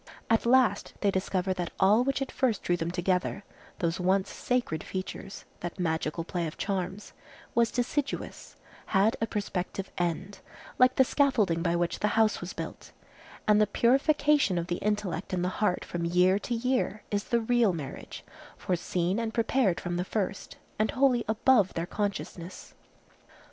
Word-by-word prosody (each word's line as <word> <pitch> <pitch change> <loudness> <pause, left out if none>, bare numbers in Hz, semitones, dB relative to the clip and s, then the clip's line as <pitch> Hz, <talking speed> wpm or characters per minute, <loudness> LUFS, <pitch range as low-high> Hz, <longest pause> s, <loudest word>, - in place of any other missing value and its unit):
At 225 +1 +3
last 255 -1 +3
they 200 - +3
discover 190 0 0
that 180 -2 -3
all 210 +5 +5
which 275 +1 0
at 270 - -8
first 245 -7 0
drew 175 - +2
them 165 -1 -2
together,—those 180 -1 -2
once 190 +2 +1
sacred 245 -11 -1
features, 190 +1 -6
that 175 0 -6
magical 160 -1 -1
play 175 -1 -2
of 155 - -8
charms,—was 200 +4 -3
deciduous, 265 +4 -3 0.3
had 205 +2 +3
a 225 - +1
prospective 195 -2 -3
end, 175 +3 -2 0.4
like 255 0 +5
the 265 - +6
scaffolding 235 - +2
by 170 0 +1
which 175 0 -1
the 210 - +1
house 220 -2 +3
was 175 +1 -5
built; - - -7 0.6
and 210 0 +5
the 210 - +4
purification 275 - +3
of 170 - -1
the 175 0 -2
intellect 205 -4 -2
and 180 -1 0
the - - +1
heart 195 -4 +1
from 170 -1 -3
year 180 +3 +3
to 240 +3 -3
year 250 -3 -1
is 205 0 -1
the 235 -2 +1
real 235 -2 +3
marriage, 150 -6 -7 0.3
foreseen 180 +2 -1
and 225 -1 -3
prepared 230 -5 +2
from 175 0 -3
the 180 - 0
first, 195 0 -3 0.2
and 215 - +2
wholly 255 -3 +3
above 220 -2 +3
their 165 - -1
consciousness. 190 -3 -5
195 Hz, 160 wpm, -28 LUFS, 175-230 Hz, 0.6 s, the